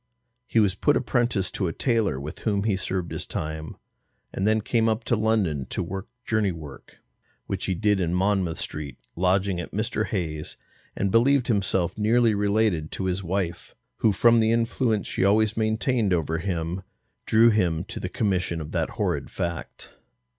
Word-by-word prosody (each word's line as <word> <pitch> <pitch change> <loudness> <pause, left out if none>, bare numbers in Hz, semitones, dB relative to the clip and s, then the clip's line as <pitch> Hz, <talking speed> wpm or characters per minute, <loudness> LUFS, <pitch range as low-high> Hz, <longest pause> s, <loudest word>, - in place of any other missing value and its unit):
He 115 - +2
was 100 -4 +3
put 145 +9 +2
apprentice 120 -6 0
to 95 - -1
a 80 - -3
tailor 115 - +1
with 75 +5 -7
whom 100 -3 0
he 105 -2 +1
served 95 -2 -3
his - - -4
time, 80 0 -5 0.6
and 95 - -1
then 110 0 +3
came 115 +1 +1
up 110 +1 -1
to 120 - +1
London 105 - 0
to - - -2
work 95 +4 -5 0.2
journey 110 -3 +1
work, 75 -5 -11 0.4
which - - -3
he 95 - 0
did 105 +1 +2
in 85 -2 0
Monmouth 95 -2 +1
Street, 75 -2 -4 0.2
lodging 95 +1 +1
at - - -9
Mr. 110 +4 -1
Hayes's 80 -7 -3 0.4
and 100 -1 0
believed 125 +3 +3
himself 95 -3 +1
nearly 115 +1 +3
related 100 -6 +1
to 95 - -2
his 95 +1 -1
wife, 90 -1 -3 0.2
who 110 - +3
from 115 +4 +5
the 110 0 +3
influence 115 -1 +1
she - - -1
always 105 +2 +3
maintained 110 -1 +1
over 80 -1 0
him, 85 0 -2 0.5
drew 115 +1 +6
him 85 -6 +1
to 95 - -5
the 90 - -4
commission 90 -5 0
of 75 -1 -7
that - - -1
horrid - - -1
fact. 85 -1 -5
100 Hz, 175 wpm, -25 LUFS, 85-110 Hz, 0.6 s, drew